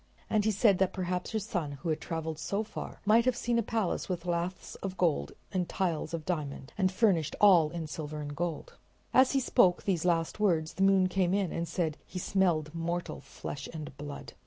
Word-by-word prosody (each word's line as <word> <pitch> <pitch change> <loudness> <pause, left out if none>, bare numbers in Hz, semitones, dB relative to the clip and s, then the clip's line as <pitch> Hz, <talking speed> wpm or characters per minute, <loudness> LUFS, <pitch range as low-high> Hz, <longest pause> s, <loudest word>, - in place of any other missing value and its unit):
And 210 -1 +2
he - - +4
said 205 -2 +4
that 190 -1 +2
perhaps 180 -1 -2
her 220 - -1
son, 180 -9 -3
who 155 +3 -1
traveled 160 0 -4
so 200 +6 -1
far, 220 - -8
might 225 +3 +5
have 255 -1 +3
seen 240 0 0
a - - +3
palace 220 -5 -1
with 180 -1 -3
laths 175 +1 -2
of 190 -1 -4
gold 160 - +1 0.2
and 185 -3 -1
tiles 170 -5 -1
of 165 -2 -4
diamond 145 -6 -4
and 190 -2 +2
furnished 185 -7 +2
all 180 -7 +6
in 165 0 -4
silver 155 -1 -5
and 145 -1 -5
gold. 170 0 -3 0.4
As 260 +1 +5
he 275 - +3
spoke 215 -8 +3
these 180 -5 0
last 170 +1 +1
words 165 -6 +2
the - - -5
moon 195 -1 +5
came 185 0 +1
in 195 -4 0
and 170 0 -2
said 160 -4 -1
he 180 - -9
smelled 175 -5 +1
mortal 170 +1 -3
flesh 140 0 -7
and 155 -4 -7
blood. 145 -1 -7
175 Hz, 205 wpm, -30 LUFS, 160-195 Hz, 0.4 s, all